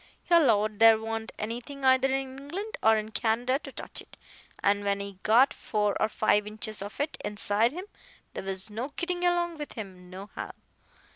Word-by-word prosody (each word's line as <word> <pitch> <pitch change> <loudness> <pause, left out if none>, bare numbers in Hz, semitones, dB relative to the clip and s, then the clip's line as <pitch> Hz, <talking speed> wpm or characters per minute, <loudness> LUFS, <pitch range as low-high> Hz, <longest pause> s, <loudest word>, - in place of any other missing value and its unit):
He - - -1
'lowed 215 -10 +4
there 225 -1 +8
wa'n't 225 0 -4
anything 245 +6 -5
either 260 0 +5
in 270 0 -2
England 375 +10 -5
or 220 0 +5
in 215 0 -4
Canada 235 +5 +1
to - - -10
touch - - -6
it. - - -17 0.5
An' 205 0 +3
when 200 0 0
he 200 -1 -7
got 240 +5 +5
four 210 -2 -1
or 215 - +3
five 210 -1 +2
inches 215 0 -3
of 205 +6 -7
it 290 +2 -2
inside 210 +2 +1
him, 360 +6 -6 0.5
there - - -5
was 195 +2 +1
no 240 +7 -4
gittin' 355 0 -2
along 345 -2 +1
with 295 - -6
him 185 -5 -9
nohow. 190 +3 -7
225 Hz, 185 wpm, -28 LUFS, 205-270 Hz, 0.5 s, there